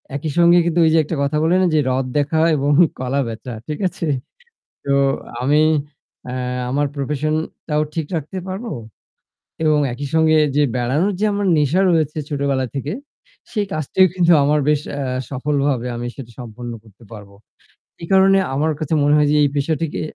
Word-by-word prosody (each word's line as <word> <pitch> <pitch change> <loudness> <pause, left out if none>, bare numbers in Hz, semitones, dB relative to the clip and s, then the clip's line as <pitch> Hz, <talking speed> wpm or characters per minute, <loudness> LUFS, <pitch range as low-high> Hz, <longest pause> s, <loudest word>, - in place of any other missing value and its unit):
একই 150 +1 -3
সঙ্গে 175 0 +6
কিন্তু 170 0 0
ওই 160 - +4
যে - - +4
একটা 155 - -4
কথা 145 +2 0
বলে 170 +3 +3
না - - +3
যে 155 - +4
রথ 130 0 0
দেখা 145 +2 0
হয় 165 - +3
এবং 145 +1 0 0.3
কলা 130 +2 -1
বেচা। 115 +2 -7
ঠিক 150 - -4
আছে? 170 - -5 0.8
তো 140 - -1 0.5
আমি 145 +4 +3 0.7
এ্যা 125 0 -3
আমার 145 +3 0
প্রফেশন 150 +2 -2 0.3
টাও 150 -1 +1
ঠিক 160 -2 -1
রাখতে 160 +5 -5
পারবো? 205 +5 -5 0.9
এবং 155 -1 +3
একই 140 +3 -5
সঙ্গে 160 -1 +4 0.2
যে 150 - +4
বেড়ানোর 135 +11 +1
যে 215 - +1
আমার 200 -1 -1
নেশা 150 +4 +2
রয়েছে 155 -2 +1
ছোটবেলা 140 -3 -1
থেকে 140 +2 -3 0.6
সেই 210 -2 -1
কাজটিও 155 +5 +2
কিন্তু 175 -2 +3
আমার 150 +1 +2
বেশ 150 -1 +2 0.2
আ - - -2 0.3
সফলভাবে 140 -2 -1
আমি 120 +1 -5
সেটা 120 -4 -10
সম্পন্ন 120 0 -7
করতে 110 +1 -20
পারব। 105 -2 -10 0.7
এই 165 - -6
কারণে 195 0 +5 0.2
আমার 155 +4 +1
কাছে 155 0 -2
মনে 145 +1 +3
হয় 150 -1 +3
যে - - +3
এই 145 - +3
পেশাটিকে 155 +2 -1
150 Hz, 175 wpm, -19 LUFS, 135-160 Hz, 0.9 s, সঙ্গে